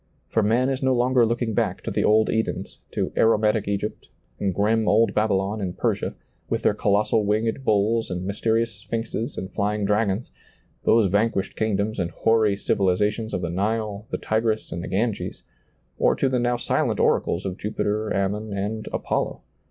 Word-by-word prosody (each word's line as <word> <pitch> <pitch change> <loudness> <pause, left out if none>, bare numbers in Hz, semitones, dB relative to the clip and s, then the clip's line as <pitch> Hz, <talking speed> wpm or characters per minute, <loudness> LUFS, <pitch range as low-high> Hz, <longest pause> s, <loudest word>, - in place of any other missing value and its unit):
For 110 - +2
man 115 +5 +2
is 135 -1 -2
no 130 -1 +2
longer 125 -1 +3
looking 120 -1 -1
back - - -1
to - - -3
the - - 0
old 110 +1 +4
Edens, 110 0 -2
to - - -2
aromatic 110 -1 +3
Egypt, 100 +1 -3 0.3
and 100 - 0
grim 105 +4 +1
old 115 +2 +4
Babylon 105 0 0
and 90 -2 -4
Persia, - - -1 0.3
with - - -1
their - - +4
colossal 105 +2 +2
winged 110 +5 0
bulls 110 +1 +2
and 90 0 -3
mysterious 110 +3 0
sphinxes 115 +2 -4
and 95 - -5
flying 105 0 0
dragons; 105 +1 0 0.5
those 110 -4 +4
vanquished 100 -1 +1
kingdoms 110 0 -1
and 85 -2 0
hoary 110 +2 +2
civilizations 105 +3 0
of 90 - -2
the 85 - -2
Nile, 105 +2 -2
the - - -2
Tigris, 110 0 -1
and 85 0 -4
the - - -5
Ganges; 100 +4 -2 0.6
or - - +4
to 135 - +1
the 130 -1 +1
now 120 0 +1
silent - - 0
oracles 90 +4 +1
of 95 -1 -4
Jupiter 105 0 -2
Ammon 105 +2 -1
and 105 +2 -3
Apollo. - - -2
105 Hz, 170 wpm, -24 LUFS, 100-115 Hz, 0.6 s, old